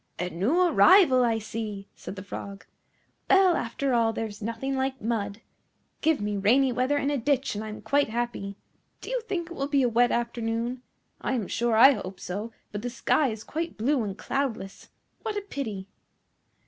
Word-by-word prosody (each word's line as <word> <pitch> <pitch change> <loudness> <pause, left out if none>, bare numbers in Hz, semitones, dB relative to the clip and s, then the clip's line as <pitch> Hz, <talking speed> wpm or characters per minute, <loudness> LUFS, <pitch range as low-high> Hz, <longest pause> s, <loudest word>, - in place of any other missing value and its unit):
"A 180 0 -3
new 230 - +1
arrival, 345 -6 +6
I 230 -2 +2
see!" 210 -2 -5
said - - -8
the 190 - -7
Frog. 200 0 -8 0.6
"Well, 380 -3 +6
after 260 +2 -1
all 230 -1 +3
there 225 - -2
is 205 -1 -9
nothing 230 +5 -3
like 265 0 -1
mud. 215 -2 -2 0.6
Give 320 -1 +2
me 205 0 -2
rainy 250 +7 +4
weather 255 +4 +1
and 285 0 0
a 285 - 0
ditch, 275 +2 +1
and 210 +1 -4
I 215 - -6
am 215 - -8
quite 285 -3 +2
happy. 230 -4 -3 0.4
Do - - -8
you - - 0
think 360 -7 -4
it - - -6
will 275 - -2
be 280 -2 +2
a 245 - +3
wet 240 +1 +4
afternoon? 235 +1 -2 0.4
I - - -1
am 225 -7 -1
sure 235 -1 0
I 265 +5 +9
hope 195 -6 -5
so, 205 +5 -5 0.2
but 205 - -4
the 245 - -3
sky 270 +4 +2
is 220 -3 -5
quite 330 +2 -4
blue 260 +5 +1
and 200 -2 -4
cloudless. 235 -9 -3 0.3
What 435 -2 -3
a - - -1
pity!" 225 - -5
240 Hz, 195 wpm, -27 LUFS, 215-280 Hz, 0.6 s, I